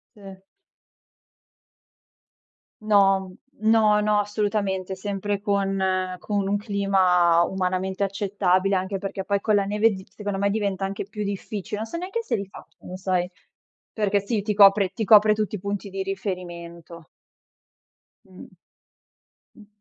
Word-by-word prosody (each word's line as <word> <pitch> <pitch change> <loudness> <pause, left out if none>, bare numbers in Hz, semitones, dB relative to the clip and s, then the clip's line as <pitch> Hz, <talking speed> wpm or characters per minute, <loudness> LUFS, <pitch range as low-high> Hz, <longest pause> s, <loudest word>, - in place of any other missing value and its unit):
Sì. 195 -2 -12 2.4
No, 195 -3 +3 0.3
no, 215 -1 +4
no, 210 0 +2
assolutamente. 200 -2 -2
Sempre 200 +1 -3
con 190 -2 0
con 200 -1 -2
un 200 - +1
clima 190 -5 +3
umanamente 190 +1 -1
accettabile, 195 -1 0
anche 190 +1 -1
perché 195 0 -5
poi 200 +1 0
con 215 - +2
la 200 -1 +3
neve 210 +3 +3
di 190 -2 -7
secondo 200 0 -5
me 200 +1 +1
diventa 200 -2 -1
anche 195 +1 -5
più 210 +2 -7
difficile. 200 0 -4
Non 220 - -3
so 335 +9 -5
neanche 385 +6 -4
se 450 - -1
li 200 - -5
fa, 195 - -13
lo 180 - -8
sai, 185 -1 -1 0.6
perché 205 -2 +1
sì, 210 +2 -2
ti 210 +1 -2
copre 200 -1 +6
ti 220 - -2
copre 215 +1 +6
tutti 210 -1 -2
i - - -7
punti 200 +1 -4
di 195 0 -3
riferimento. 175 -4 -6 1.2
Mh. 185 -2 -14 1.1
Mh. 215 - -16
200 Hz, 140 wpm, -24 LUFS, 190-210 Hz, 2.4 s, copre